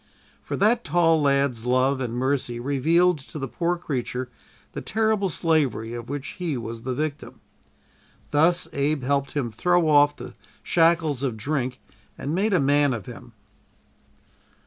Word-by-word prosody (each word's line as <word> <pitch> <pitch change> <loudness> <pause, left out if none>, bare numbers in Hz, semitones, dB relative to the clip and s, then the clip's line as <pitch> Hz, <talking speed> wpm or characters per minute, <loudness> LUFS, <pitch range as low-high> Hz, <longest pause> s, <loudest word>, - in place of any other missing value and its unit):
For - - -5
that 230 +4 +3
tall 165 -2 +3
lad's 140 -4 +1
love 130 +2 +2
and 120 -2 -3
mercy 125 -2 -1
revealed 155 +6 +2
to 140 - -10
the 135 -2 -3
poor 175 +6 -1
creature 130 -6 -4 0.4
the - - -6
terrible 220 -2 0
slavery 145 -10 0
of 120 0 -7
which 145 0 -4
he 165 -6 -2
was 115 -1 -6
the 125 +1 -3
victim. 150 +1 -4 0.9
Thus 170 +4 +3
Abe 140 0 0
helped 140 0 0
him 130 -6 -2
throw 175 +9 +2
off 145 -1 +5
the - - -9 0.3
shackles 165 -5 +2
of 130 -5 -2
drink 130 +1 -2 0.4
and 145 - -4
made 200 +5 +1
a 185 - +3
man 145 0 +3
of 105 -5 -7
him. - - -11
145 Hz, 150 wpm, -24 LUFS, 130-165 Hz, 0.9 s, off